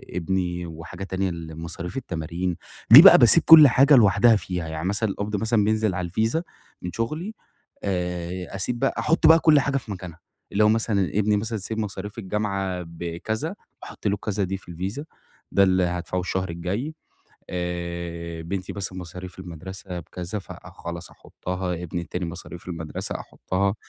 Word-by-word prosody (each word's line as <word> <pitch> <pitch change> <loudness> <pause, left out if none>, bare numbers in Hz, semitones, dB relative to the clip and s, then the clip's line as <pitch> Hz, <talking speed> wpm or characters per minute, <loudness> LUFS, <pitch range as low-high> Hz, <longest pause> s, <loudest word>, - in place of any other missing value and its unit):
ابني، 90 0 -1
وحاجة 85 +3 -8
تانية 95 0 -1
لمصاريف 85 +3 -6
التمارين 85 -4 -3 0.4
دي - - +13
بَقى - - +10
باسيب - - +7
كل 155 -3 +10
حاجة 135 +3 +6
لوحدها 110 0 +6
فيها، 90 -4 -3
يعني 80 +3 -4
مثلًا 105 +2 0
القبض 105 +2 -3
مثلًا 110 +1 +1
بينزل 110 -3 +1
على 90 -2 -3
الVisa 110 - 0 0.4
من 90 - -5
شغلي 155 - -3 0.5
آآ، 90 -1 -3
أسيب 120 +5 -2
بَقى 135 - +1
أحُط 160 0 +3
بَقى 165 +1 +8
كل 155 -3 +5
حاجة 135 0 0
في 120 -5 -7
مكانها 90 -3 -8 0.3
لو 105 +1 +4
مثلًا 110 -4 +1
ابني 105 0 +2
مثلًا 110 +1 -2
say 110 +4 -5
مصاريف 105 0 -5
الجامعة 95 -3 -2
بكذا، 85 +6 -4 0.3
باحط - - -6
له 100 - +2
الكذا 100 0 -2
دي 95 +1 -2
في 90 - -13
الVisa 95 - -4 0.5
ده 100 - +5
اللي 95 -1 +3
هادفعه 90 +1 -2
الشهر 95 0 -2
الجاي 100 - -3 0.6
آآ، 85 -1 -4
بنتي 95 +2 -4
مثلًا 95 -2 -5
مصاريف 90 +1 -9
المدرسة 90 +1 -7
بكذا، 90 +5 -6
فخلاص 85 -2 -9
أحُطها 90 -1 -5
ابني 85 0 -4
التاني 90 +1 -4
مصاريف 85 +1 -9
المدرسة 80 -3 -5
أحُطها، 100 +2 -2
95 Hz, 155 wpm, -24 LUFS, 85-105 Hz, 0.6 s, دي